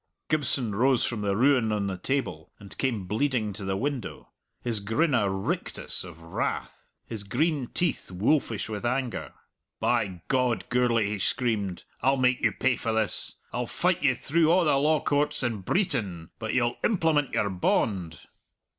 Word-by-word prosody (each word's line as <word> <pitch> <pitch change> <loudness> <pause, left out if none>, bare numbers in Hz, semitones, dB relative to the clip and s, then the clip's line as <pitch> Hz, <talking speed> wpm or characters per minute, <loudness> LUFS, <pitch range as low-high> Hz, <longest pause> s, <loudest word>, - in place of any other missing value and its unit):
Gibson 140 -7 +1
rose 125 +4 +3
from 115 -3 -2
the 100 -1 0
ruin 125 -1 +3
on 105 -1 0
the 95 -1 -2
table 90 - -2
and 100 -1 -12
came 115 -8 0
bleeding 110 +1 0
to 100 +1 -7
the 95 0 -1
window, 140 +1 -4 0.3
his 115 -3 0
grin 115 +10 +1
a 105 -6 +3
rictus 95 0 -2
of 85 -3 -11
wrath, 85 - -4
his 110 -3 -5
green 145 +5 0
teeth 170 +1 -1
wolfish 110 +4 +1
with 105 0 -5
anger. 125 0 -1 0.5
"By 90 -4 0
God, 125 -3 +1
Gourlay," 120 -3 +3
he 105 0 -3
screamed, 105 -5 0 0.2
"I'll 135 +1 +3
make 125 -1 +2
you - - +3
pay 130 -2 +1
for 115 - -2
this; 110 -1 -1 0.2
I'll - - -2
fight - - +1
you - - +3
through 160 +2 +2
a' 180 0 +4
the 150 -3 +4
law 150 +1 +3
courts 145 -1 +1
in 115 -5 -1
Breetain, 100 - -1
but 110 +1 -3
you'll 120 -1 +1
implement 160 - +2
your 100 - +1
bond." 90 -2 0
120 Hz, 165 wpm, -27 LUFS, 100-135 Hz, 0.5 s, a